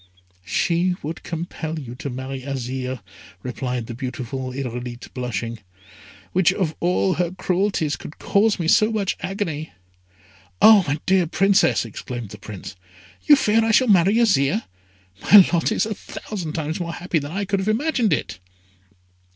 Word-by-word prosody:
"She 175 - +1
would 160 +3 -5
compel 165 -1 -5
you 130 -6 -7
to 135 +3 -6
marry 130 +1 -5
Azire," 130 -2 -4 0.4
replied 125 -1 -3
the 120 - -7
beautiful 130 +1 -5
Irolite, 125 -2 -6
blushing; 115 -2 -4 0.7
"which 185 0 +3
of 185 -5 -2
all 180 +2 +1
her 175 -1 0
cruelties 180 -3 -1
could 150 - -10
cause 210 +1 +2
me 170 -4 -2
so 215 +6 +4
much 205 -4 -1
agony?" 160 - -4 0.9
"Ah! 215 -3 +8
my 145 +2 -1
dear 185 -2 +3
Princess," 195 - +3
exclaimed 115 0 -7
the 105 - -11
Prince, 100 -1 -9 0.5
"you 295 - +8
fear 225 -4 +2
I 225 - +1
shall 240 +2 +4
marry 195 +1 +5
Azire! 140 - +3 0.6
My 200 - +8
lot 170 +5 +2
is 220 - +1
a 220 - -3
thousand 185 -5 -7
times 160 +1 -3
more 170 -1 -4
happy 175 -1 -1
than 145 +1 -7
I 200 +1 -2
could 195 0 0
have 190 +2 -1
imagined 240 - +1
it!" 150 - -2
160 Hz, 155 wpm, -22 LUFS, 130-195 Hz, 0.9 s, Ah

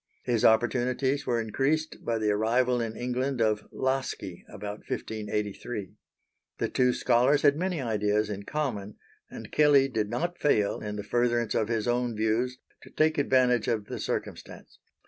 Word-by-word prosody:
His 120 -3 0
opportunities 125 +4 +2
were 120 -2 +1
increased 140 +8 -1
by 115 -1 0
the 110 -1 +1
arrival 120 +4 +2
in 115 -1 -4
England 125 +2 -2
of 110 -2 +1
Laski, 130 -9 -3
about 105 0 -6
1583. 105 -3 -4 0.6
The - - -1
two 125 0 +3
scholars 125 +4 +3
had 145 -1 +5
many 180 +1 -1
ideas 105 -3 0
in 100 -1 -5
common, 105 -5 -3 0.3
and - - -9
Kelley 145 -3 +5
did 110 -5 -2
not 175 +7 -2
fail, 105 -8 +2
in 105 -1 -4
the 105 - -4
furtherance 120 +1 +1
of 110 - +1
his 115 -1 -1
own 120 -1 0
views, 110 +4 0 0.2
to - - -14
take 155 0 +1
advantage 125 -4 +3
of 110 -4 0
the - - -6
circumstance. - - -5
120 Hz, 155 wpm, -28 LUFS, 105-130 Hz, 0.6 s, had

